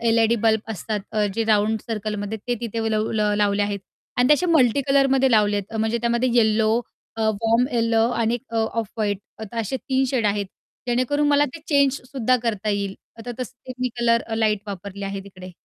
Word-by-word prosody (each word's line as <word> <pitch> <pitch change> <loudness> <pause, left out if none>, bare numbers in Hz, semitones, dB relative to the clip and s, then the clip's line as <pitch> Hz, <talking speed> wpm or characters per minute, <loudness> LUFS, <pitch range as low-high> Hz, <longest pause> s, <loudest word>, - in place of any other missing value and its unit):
LED 230 0 +3
bulb 220 -1 +4
असतात, 210 +2 -3
अ, 210 -1 +2
जे 225 - 0
round 215 0 +2
सर्कलमध्ये 215 -1 -3
ते 245 - +2
तिथे 225 -1 -2
लव 215 0 0 0.2
लावले 205 0 +2
आहेत 205 -1 -2 0.4
आणि 245 +1 +3
ते 300 - +8
असे 360 - -1
मल्टीकलरमध्ये 270 -2 +3
लावलेत. 205 -2 +3
अ, 225 - -5
म्हणजे 220 +2 0
त्यामध्ये 235 +2 +1
येलो, 220 -1 +3 0.4
अ, 225 - -4
वॉर्म 225 +3 +2
येलो 230 -1 +2
आणि 230 -1 0
1 245 - -6
अ, - - 0
ऑफ 225 -1 -1
व्हाईट 205 -3 0 0.4
असे 230 +3 -2
3 265 +1 0
शेड 240 -5 +1
आहेत, 205 0 0 0.4
जेणेकरून 255 +5 +1
मला 290 0 +4
ते 330 - -8
चेंजसुद्धा 270 -3 +2
करता 215 -2 -1
येईल. 200 -1 -2 0.2
आता 240 +2 -6
तसं 255 +1 -7
मी 255 - +1
कलर 230 0 +3
अ, 225 - -3
लाईट 215 -2 +1
वापरले 200 +1 -6
आहे 195 0 -4
तिकडे. 185 -2 -11
225 Hz, 185 wpm, -23 LUFS, 210-245 Hz, 0.4 s, ते